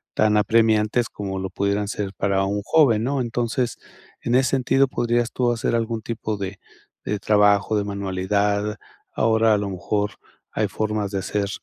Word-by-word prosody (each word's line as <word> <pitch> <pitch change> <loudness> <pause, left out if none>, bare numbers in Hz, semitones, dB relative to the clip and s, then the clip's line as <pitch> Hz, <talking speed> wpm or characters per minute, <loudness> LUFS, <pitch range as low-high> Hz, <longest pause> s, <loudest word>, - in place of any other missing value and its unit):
tan 105 -1 +3
apremiantes, 110 +2 +2
como 95 -2 -5
lo 95 0 -4
pudieran 100 +1 -1
ser 100 -1 -3
para 100 0 +1
un 100 +1 -1
joven, 120 -6 +3
¿no? 135 +2 0
Entonces, 120 +1 -1 0.4
en 120 - -2
ese 130 -1 +3
sentido, 135 +1 +3
podrías 120 -1 0
tú 125 -1 +1
hacer 120 0 -1
algún 115 -1 -1
tipo 110 -1 -4
de 95 0 -5 0.5
de 105 - -2
trabajo, 105 +1 +3
de 105 - 0
manualidad. 100 +1 -1 0.4
Ahora, 110 -1 +3
a - - +3
lo 100 -1 -3
mejor, 100 +3 -2 0.4
hay 105 -1 0
formas 105 +1 -2
de 100 - -1
hacer, 100 +1 -2
105 Hz, 165 wpm, -23 LUFS, 100-115 Hz, 0.5 s, tan